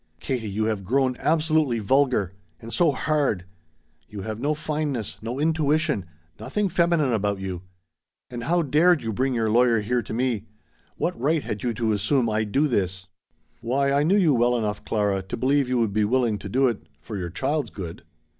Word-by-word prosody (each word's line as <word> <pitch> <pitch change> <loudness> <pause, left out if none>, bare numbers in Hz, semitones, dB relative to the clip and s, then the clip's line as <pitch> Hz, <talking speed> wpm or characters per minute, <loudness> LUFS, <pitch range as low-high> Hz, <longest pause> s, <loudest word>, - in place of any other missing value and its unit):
"Katie, 120 -5 -3
you 105 +2 -1
have 110 -3 -1
grown 130 +5 +1
absolutely 155 -5 +2
vulgar. 115 -4 +1 0.3
And 115 +1 -8
so 170 -4 +4
hard. 140 - 0 0.6
You 105 -2 -7
have 110 +1 -5
no 145 +4 0
fineness 150 -6 -3
no 120 +4 -4
intuition 155 - +1 0.3
nothing 210 -2 -1
feminine 170 -6 +2
about 100 -2 0
you. 95 -2 -5 0.7
And 120 -2 -6
how 170 +3 +2
dared 155 +3 +3
you 110 -1 -2
bring 130 +4 0
your 110 -2 +1
lawyer 120 -1 +4
here 120 +4 0
to - - -10
me? 115 -3 -1 0.5
What - - -2
right 150 +2 +1
had 105 - -4
you 120 -2 -1
to 115 -1 0
assume 115 +3 +1
I'd 110 -1 -1
do 145 +6 +3
this?" 95 -6 -2 0.5
"Why 135 +4 +1
I 140 +1 +3
knew 175 +7 +3
you 170 -7 +4
well 120 0 +3
enough, 105 -2 -2
Clara, 100 -3 0
to 95 - -6
believe 135 +2 +2
you 125 - +1
would 115 -4 +1
be 105 0 +2
willing 115 -2 +1
to 100 - -7
do 130 +6 +3
it 115 -4 -2 0.2
for 110 - -8
your 90 -3 -3
child's 135 - -1
good." 85 -6 -7
125 Hz, 190 wpm, -24 LUFS, 105-145 Hz, 0.7 s, so